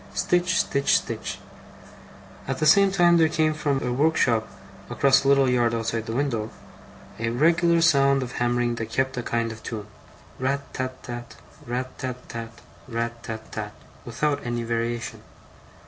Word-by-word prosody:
Stitch, 180 +1 +1
stitch, 140 0 +2
stitch. - - -5 1.1
At 135 -1 -2
the 155 - 0
same 195 +5 +6
time 175 -3 +5
there 160 -1 +4
came 155 -1 +1
from 145 -3 -1
a 125 - -1
workshop 125 -5 +2 0.4
across 135 0 +3
a - - -1
little 140 -1 +5
yard 120 -2 +2
outside 115 0 -2
the 115 - -3
window, 120 -6 -1 0.7
a 115 0 -1
regular 170 +6 +3
sound 140 -4 +4
of 125 - -6
hammering 120 0 +1
that 115 - -4
kept 130 +3 0
a - - 0
kind 115 -1 -1
of 110 0 -10
tune: 105 -2 -6 0.5
RAT 140 +2 -2
tat 130 -1 -4
tat, 120 -1 -7 0.3
RAT 125 +2 -3
tat 130 -1 -3
tat, 115 -1 -8 0.3
RAT 115 -1 -3
tat 110 -2 -7
tat, 105 -1 -5 0.3
without 140 +5 -1
any 120 -1 -2
variation. 115 0 -3
125 Hz, 160 wpm, -25 LUFS, 115-140 Hz, 1.1 s, same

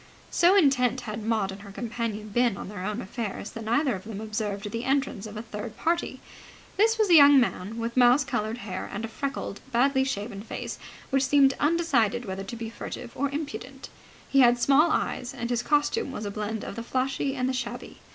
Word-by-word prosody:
So 355 +3 +5
intent 260 - +3
had 215 -2 -5
Maud 215 -3 0
and 195 +1 -9
her 200 - -11
companion 225 -1 -4
been 240 -1 +2
on - - -7
their 205 -3 -6
own 210 +4 -3
affairs 210 0 -5
that 225 -2 -7
neither 255 +4 +2
of 190 -2 -6
them 210 -2 -7
observed 210 -2 -3
the 230 +1 -3
entrance 265 -6 -1
of 210 0 -9
a 215 - -5
third 215 0 -7
party. 340 +1 -1 0.6
This 450 +3 +3
was 430 -4 +2
a - - +7
young 285 -3 +9
man 225 -3 -1
with 230 0 -3
mouse 250 +3 +6
coloured 215 +2 -2
hair 185 -2 -5
and 215 +3 -4
a - - -4
freckled, 265 -3 -4
badly 265 +2 +3
shaven 205 -5 -4
face 220 - -6 0.3
which 270 0 +2
seemed 275 -2 +5
undecided 275 -8 +2
whether 190 0 -4
to 195 +4 -7
be 225 -1 -6
furtive 235 +1 -7
or 280 +1 0
impudent. 280 -2 -6 0.4
He 275 - +3
had 240 -1 +6
small 280 +6 +5
eyes, 250 -4 -1
and 240 -1 -4
his 240 -1 +1
costume 295 - +1
was 215 -5 -5
a 200 - -3
blend 215 +1 -4
of - - -6
the - - -3
flashy 265 +3 -1
and 255 -1 0
the 260 - 0
shabby. 260 - -5
240 Hz, 210 wpm, -27 LUFS, 215-270 Hz, 0.6 s, young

